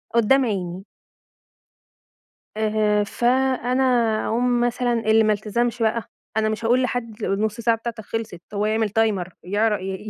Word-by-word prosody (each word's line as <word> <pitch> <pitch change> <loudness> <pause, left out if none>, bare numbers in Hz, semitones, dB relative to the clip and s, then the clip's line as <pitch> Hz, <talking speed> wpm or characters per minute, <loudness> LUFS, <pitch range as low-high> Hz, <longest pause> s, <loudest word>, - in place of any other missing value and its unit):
قدّام 255 +4 +4
عيني. 190 -2 -3 1.7
آآ، 210 -1 +1
فأنا 255 +3 +1 0.4
أقوم 245 +1 +1
مثلًا 245 0 0
اللي 220 -1 +3
ما 215 - +3
التزمش 235 +3 -2
بقى، 225 +1 0 0.3
أنا 215 0 +2
مش 220 +1 -3
هاقول 245 +3 +3
لحد 230 -3 -3
النُص 210 +2 -1
ساعة 230 0 +2
بتاعتك 230 -1 -6
خلصت، 220 -6 -5
هو 205 +1 0
يعمل 220 0 +1
timer 200 -5 +1 0.2
يعر 210 +3 +1
ي 195 +3 -5
220 Hz, 135 wpm, -22 LUFS, 210-240 Hz, 1.7 s, قدّام